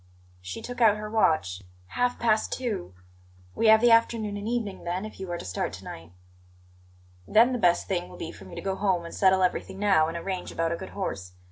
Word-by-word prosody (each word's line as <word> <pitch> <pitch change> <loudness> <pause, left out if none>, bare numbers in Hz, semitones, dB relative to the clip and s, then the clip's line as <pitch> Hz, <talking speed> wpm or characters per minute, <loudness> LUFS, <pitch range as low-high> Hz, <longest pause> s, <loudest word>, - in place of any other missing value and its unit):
She 95 +1 -7
took 245 0 -6
out 215 -2 +6
her 210 0 -6
watch. 155 - +1 0.3
"Half 245 - 0
past 220 -2 +1
two. 95 - -3 0.6
We 225 - +1
have 220 0 +7
the 240 0 +5
afternoon 230 -2 +3
and 205 +1 -5
evening, 225 -5 -3
then, 180 +4 -3
if 215 - -10
you 190 -1 -6
are 175 - -2
to - - -8
start 90 - -3
to - - -9
night." 80 +1 -9 1.2
"Then 235 +4 +5
the 250 - -1
best 175 -4 +3
thing 180 -3 -2
will - - -12
be 165 - -6
for 95 - -13
me 95 - -11
to - - -5
go 195 -1 -2
home 190 -4 0
and 170 - -8
settle 190 -1 +4
everything 190 +1 -1
now, 195 -6 +3
and 165 +1 -4
arrange 185 +1 -4
about 165 0 -1
a - - 0
good 190 +2 -8
horse. 95 - -4
190 Hz, 225 wpm, -27 LUFS, 170-220 Hz, 1.2 s, have